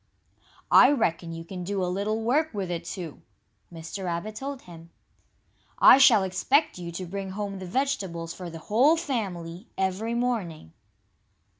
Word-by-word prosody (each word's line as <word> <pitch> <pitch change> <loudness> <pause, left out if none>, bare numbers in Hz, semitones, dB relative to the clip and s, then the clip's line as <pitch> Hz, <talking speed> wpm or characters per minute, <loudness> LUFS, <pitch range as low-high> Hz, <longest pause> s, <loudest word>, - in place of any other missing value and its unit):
"I 255 - +8
reckon 170 - 0
you 165 0 -7
can 180 +1 -7
do 195 +1 -2
a - - +1
little 205 +5 -2
work 290 +3 +1
with 190 -3 -3
it, 170 -1 -4
too," 170 -4 -7 0.5
Mr. 170 +3 -7
Rabbit 175 +5 -3
told 275 +2 -6
him. 165 -1 -13 0.9
"I 265 - +8
shall 245 -7 +7
expect 260 - +1
you 170 -1 -6
to 185 +2 -5
bring 195 +2 -5
home 200 -1 -4
the 185 - -7
vegetables 185 -9 -2
for 180 -1 -8
the 165 - -8
whole 245 - +3
family, 195 - -4
every 190 +5 -1
morning." 200 - -3
190 Hz, 155 wpm, -26 LUFS, 170-235 Hz, 0.9 s, I